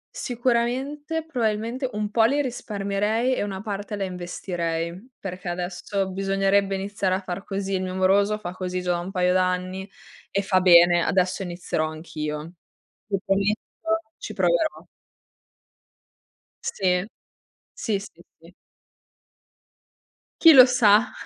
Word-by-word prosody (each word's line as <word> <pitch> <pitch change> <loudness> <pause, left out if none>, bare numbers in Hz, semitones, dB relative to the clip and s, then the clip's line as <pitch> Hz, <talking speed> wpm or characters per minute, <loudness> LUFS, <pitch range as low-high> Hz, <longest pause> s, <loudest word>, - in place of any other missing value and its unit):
Sicuramente, 260 +6 -1
probabilmente 240 -1 -1
un 210 0 -2
po' 225 0 +4
li 280 +5 +2
risparmierei 215 -1 -1
e - - -1
una 195 -2 -4
parte 205 0 -4
la 200 - -3
investirei, 175 +1 -4
perché 180 -2 -6
adesso 180 +2 -3
bisognerebbe 195 +1 +1
iniziare 195 -1 -1
a - - -1
far 185 +1 -5
così. 195 0 -3
Il 185 - 0
mio 185 0 -4
moroso 200 +3 +3
fa 175 -4 -6
così 185 0 -4
già 180 - 0
da 175 - 0
un 175 +2 -5
paio 180 -1 +1
d'anni 185 +1 -1 0.4
e 200 - -1
fa 185 -1 +2
bene. 175 -1 +7
Adesso 185 +1 +1
inizierò 175 -3 -2
anch'io. 155 0 -6 0.5
Ti 200 -2 -1
prometto 210 +12 -1 0.2
ci - - -7
proverò. 325 -11 0 1.8
Sì. 180 -1 0 0.7
Sì, 210 -4 -1
sì, 195 -4 -12 0.2
sì. 165 +2 -17 1.9
Chi 330 -1 +9
lo 255 -3 +10
sa? 240 -2 +4
195 Hz, 125 wpm, -24 LUFS, 180-220 Hz, 1.9 s, lo